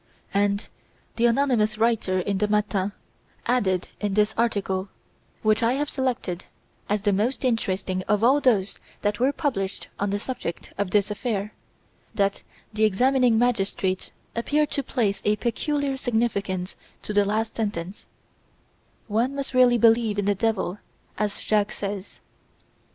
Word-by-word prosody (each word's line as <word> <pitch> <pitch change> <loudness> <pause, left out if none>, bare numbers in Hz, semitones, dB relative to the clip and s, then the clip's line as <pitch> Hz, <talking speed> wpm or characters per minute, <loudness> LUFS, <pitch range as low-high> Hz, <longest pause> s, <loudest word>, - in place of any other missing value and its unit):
'" - - -38
And 200 +1 +1 0.5
the 240 +1 +4
anonymous 230 -4 +2
writer 220 -4 +2
in 190 +1 -1
the 210 - +2
"Matin" 205 -2 +1 0.5
added 190 -7 +1
in 205 -2 -1
this 210 0 +3
article 200 -4 0 0.5
which 215 +1 +3
I 230 +1 +3
have 290 +2 -1
selected 245 -9 -2 0.4
as 205 0 0
the 205 -1 +3
most 235 +7 0
interesting 190 -6 0
of 210 +1 +2
all 270 +5 +5
those 210 -7 +2 0.2
that 205 0 0
were 260 +3 +3
published 245 -11 -2
on 205 - 0
the 200 - 0
subject 205 -6 -5
of 200 -2 -1
this 205 +1 +2
affair 210 -1 -2 0.6
that 200 -2 +1 0.3
the 215 +1 0
examining 245 +3 +4
magistrate 195 -5 0 0.2
appeared 290 +5 +1
to 280 - -1
place 220 -7 -1
a 210 - +3
peculiar 275 +4 -1
significance 205 -7 -1 0.3
to 210 - -4
the 205 0 +5
last 215 +2 -1
sentence: 205 -4 -4 1.0
"One 230 +6 0
must 275 -1 -3
really 250 -1 +6
believe 225 -2 +4
in 205 - 0
the 205 - +3
Devil, 205 -2 -1 0.4
as 210 -1 -1
Jacques 210 -1 +1
says." 200 -1 -5
210 Hz, 145 wpm, -25 LUFS, 200-240 Hz, 1.0 s, really